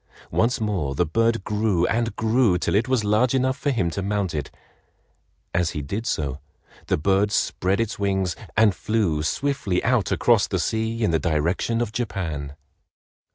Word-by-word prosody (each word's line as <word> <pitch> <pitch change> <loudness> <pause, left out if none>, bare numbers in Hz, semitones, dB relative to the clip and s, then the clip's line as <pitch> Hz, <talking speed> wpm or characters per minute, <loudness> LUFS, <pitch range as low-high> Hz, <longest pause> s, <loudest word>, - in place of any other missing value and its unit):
Once 120 +2 +1
more 95 -11 -1
the - - +2
bird 115 +6 +1
grew 105 -4 +1
and 115 -1 0
grew 110 -4 +2
till - - -1
it 110 +4 +2
was 130 -4 +1
large 110 +5 +2
enough 130 0 +1
for 140 +2 -2
him 100 -11 0
to 100 - -3
mount 100 -2 -1
it. 75 -3 -3 1.0
As 85 -1 +1
he 75 - -3
did 105 - -4
so, 70 -8 -2 0.5
the - - +1
bird 95 +5 +2
spread 95 -1 0
its 115 -3 -2
wings 95 -3 0 0.2
and 110 -2 +5
flew, 95 -7 0
swiftly 95 - -1
out 120 -4 +1
across - - +3
the - - -1
sea 110 +1 -1
in 105 - +2
the 80 - +2
direction 85 +8 0
of 115 -3 -2
Japan. 85 -11 -4
105 Hz, 170 wpm, -23 LUFS, 85-115 Hz, 1.0 s, and